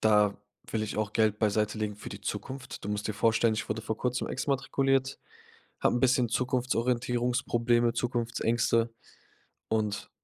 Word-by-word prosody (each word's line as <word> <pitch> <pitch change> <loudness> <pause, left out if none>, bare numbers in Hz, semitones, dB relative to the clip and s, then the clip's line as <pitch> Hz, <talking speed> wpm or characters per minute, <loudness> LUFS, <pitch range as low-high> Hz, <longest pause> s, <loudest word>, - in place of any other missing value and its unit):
da 105 -2 +4 0.4
will 110 - 0
ich 110 - -4
auch 110 -1 -1
Geld 110 -2 +2
beiseitelegen 105 0 0
für - - -8
die - - -8
Zukunft. 130 -5 -5
Du - - -4
musst 105 0 -2
dir 110 - 0
vorstellen, 115 +1 +3
ich 110 - -4
wurde 110 +1 -2
vor 110 0 -2
Kurzem 125 +1 -1
exmatrikuliert, 135 -1 0 0.6
habe - - +3
'n - - 0
bisschen 125 -2 +3
Zukunftsorientierungsprobleme, 120 -1 +1
Zukunftsängste 120 -1 +1 0.8
und 105 -2 -1
115 Hz, 140 wpm, -29 LUFS, 110-125 Hz, 0.8 s, da